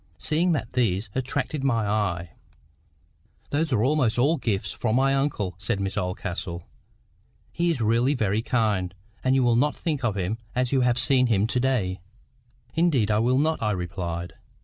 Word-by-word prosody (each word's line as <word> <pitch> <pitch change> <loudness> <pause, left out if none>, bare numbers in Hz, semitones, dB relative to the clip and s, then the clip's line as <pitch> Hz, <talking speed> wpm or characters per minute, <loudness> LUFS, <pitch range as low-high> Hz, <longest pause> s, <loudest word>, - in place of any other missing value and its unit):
Seeing 170 +3 +1
that 115 -7 -3
these 110 -4 0
attracted 135 +2 -2
my 115 -5 +1
eye— 90 -5 -1 1.2
"Those 155 +1 0
are 110 -4 +2
almost 130 -4 +2
all 145 +7 +3
gifts 100 - -1
from 110 +3 -1
my 135 +1 +3
uncle," 135 -9 -1
said 105 +1 -1
Miss 95 -1 -2
Oldcastle. 90 -2 -4 0.8
"He 170 +1 0
is 155 -8 -1
really 115 +6 +2
very 110 -3 0
kind, 105 -7 0 0.3
and 130 +1 +3
you 135 - +3
will 120 -1 +3
not 145 +5 +2
think 150 -6 -2
of 110 -4 0
him 100 +4 -2 0.2
as 125 -1 +1
you 135 -2 +3
have 125 -1 +2
seen 130 0 +3
him 105 -3 +2
to 125 +2 0
day 110 -9 0 0.4
?" 120 0 -36
"Indeed 150 -11 +2
I 105 - +3
will 125 +3 +2
not," 155 +3 +1
I 105 - +1
replied. 85 -1 -4
120 Hz, 175 wpm, -25 LUFS, 100-135 Hz, 1.2 s, all